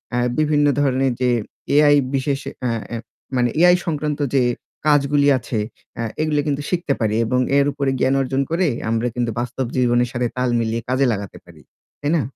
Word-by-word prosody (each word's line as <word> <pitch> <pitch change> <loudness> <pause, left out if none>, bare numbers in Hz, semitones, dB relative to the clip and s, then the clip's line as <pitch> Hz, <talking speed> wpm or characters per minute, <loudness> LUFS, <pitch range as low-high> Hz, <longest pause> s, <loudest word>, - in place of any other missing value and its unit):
আ - - +1 0.2
বিভিন্ন 150 -1 +3 0.2
ধরনের 135 -1 +2
যে 125 - +3 0.5
এআই 145 0 +6 0.2
বিশেষ 135 +1 0 0.3
আ - - +1 0.2
এ - - -2 0.4
মানে 120 -1 +2
এআই 180 0 +7
সংক্রান্ত 150 -2 -2 0.2
যে 130 - +4 0.4
কাজগুলি 145 0 +3
আছে 115 -2 -3 0.6
এগুলো 155 -1 +1
কিন্তু 145 -1 -1
শিখতে 170 -5 0
পারি 110 -1 0
এবং 125 +3 +1 0.2
এর 140 - +4
উপরে 140 -2 -1
জ্ঞান 130 +1 +2
অর্জন 135 +1 0
করে 175 +1 +2 0.2
আমরা 115 +1 0
কিন্তু 120 -2 -1
বাস্তব 125 +2 -3
জীবনের 120 -1 +2
সাথে 120 -1 -1
তাল 125 -1 +1
মিলিয়ে 115 0 -1
কাজে 130 +1 +2
লাগাতে 100 -1 -6
পারি। 80 -3 -16 0.4
তাই 145 - 0
না? 160 - +2
135 Hz, 175 wpm, -21 LUFS, 120-145 Hz, 0.6 s, এআই